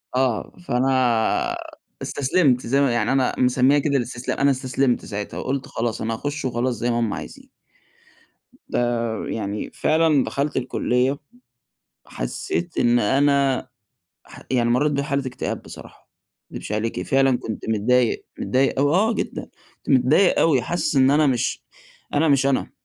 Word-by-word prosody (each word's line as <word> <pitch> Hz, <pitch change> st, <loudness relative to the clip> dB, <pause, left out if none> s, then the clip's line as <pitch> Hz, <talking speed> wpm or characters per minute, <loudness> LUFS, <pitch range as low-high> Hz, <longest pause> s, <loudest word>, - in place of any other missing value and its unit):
آه، 130 Hz, -4 st, 0 dB, 0.2 s
فأنا 125 Hz, -2 st, +1 dB, 0.5 s
استسلَمت، 135 Hz, -3 st, +1 dB
زي 135 Hz, +3 st, +2 dB
ما 135 Hz, -3 st, +3 dB
يعني 115 Hz, -2 st, 0 dB
أنا 135 Hz, -2 st, +2 dB
مسمِّيها 130 Hz, +3 st, +3 dB
كده 140 Hz, 0 st, +1 dB
الاستسلام 120 Hz, 0 st, -3 dB
أنا 140 Hz, 0 st, +4 dB
استسلَمت 130 Hz, -1 st, 0 dB
ساعتها، 105 Hz, 0 st, -5 dB
وقُلت 135 Hz, -1 st, -3 dB
خلاص 115 Hz, -1 st, -3 dB
أنا 115 Hz, +1 st, -2 dB
هاخُش 145 Hz, +5 st, -4 dB
وخلاص 125 Hz, 0 st, -1 dB
زي 120 Hz, +1 st, -1 dB
ما 120 Hz, -, 0 dB
هُم 115 Hz, -3 st, 0 dB
عايزين. -, -, -9 dB, 1.2 s
ده -, -, 0 dB, 0.5 s
يعني 105 Hz, -1 st, -4 dB
فعلًا 155 Hz, -3 st, +2 dB
دخَلت 140 Hz, +1 st, -2 dB
الكلية، 130 Hz, +1 st, 0 dB, 0.9 s
حسِّيت 375 Hz, -, -4 dB
إن 120 Hz, 0 st, +3 dB
أنا 140 Hz, +3 st, +2 dB, 0.6 s
ح -, -, -14 dB
يعني 120 Hz, -2 st, +2 dB
مرِّيت 145 Hz, +5 st, +2 dB
بحالة 140 Hz, -1 st, -1 dB
اكتئاب 125 Hz, -, -4 dB
بصراحة، -, -, -13 dB, 0.4 s
ما -, -, -9 dB
أكدِبش -, -, -6 dB
عليكِ، 105 Hz, -3 st, -2 dB
فعلًا 135 Hz, +2 st, +2 dB
كنت 110 Hz, 0 st, -6 dB
متضايِق، 115 Hz, +3 st, +1 dB
متضايِق 130 Hz, +1 st, +1 dB
أوي 145 Hz, +1 st, +3 dB
آه 220 Hz, +4 st, +3 dB
جدًا، -, -, -3 dB, 0.3 s
كنت -, -, -20 dB
متضايِق 135 Hz, +8 st, +4 dB
أوي، 140 Hz, -6 st, +3 dB
حاسِس 175 Hz, -4 st, -1 dB
إن 130 Hz, 0 st, +5 dB
أنا 150 Hz, +1 st, +4 dB
مش 125 Hz, -3 st, 0 dB, 0.5 s
أنا 155 Hz, +2 st, +3 dB
مش 140 Hz, -2 st, +3 dB
أنا، 140 Hz, -, 0 dB
130 Hz, 145 wpm, -22 LUFS, 120-140 Hz, 1.2 s, إن